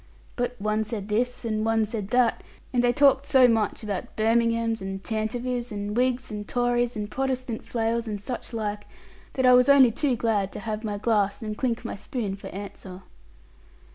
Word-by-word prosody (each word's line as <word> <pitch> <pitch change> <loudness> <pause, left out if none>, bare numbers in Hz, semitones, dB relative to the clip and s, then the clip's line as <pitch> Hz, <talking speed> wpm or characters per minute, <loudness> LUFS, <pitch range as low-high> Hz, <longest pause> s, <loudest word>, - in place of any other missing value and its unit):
But 245 0 -2
one 215 +1 0
said 215 -2 -5
this, 245 +3 -1
and 215 -1 -1
one 225 0 +2
said 210 -2 -4
that; 245 +1 +2 0.3
and 245 -1 +2
they 245 - +4
talked 275 0 +4
so 260 -2 +6
much 225 -1 0
about 205 -3 -4
Birminghams, 230 0 +1
and 195 0 -5
Tantivies, 240 +2 -2
and 205 0 -4
Whigs 255 0 0
and 210 -1 -5
Tories, 245 0 +1
and 210 -1 -3
Protestant 255 -3 -2
flails 230 0 -1
and 210 -2 -3
such 240 +5 -5
like, 210 -2 -3 0.5
that 260 - 0
I 250 - +7
was 250 +2 +5
only 270 -4 +7
too 270 +2 +1
glad 210 -4 0
to - - -6
have 215 +1 -4
my 210 -2 -3
glass 205 -1 0
and 215 -1 -4
clink 240 0 -2
my - - -3
spoon 205 -1 -4
for 200 - -10
answer.' 190 -1 -8
225 Hz, 185 wpm, -26 LUFS, 210-245 Hz, 0.5 s, I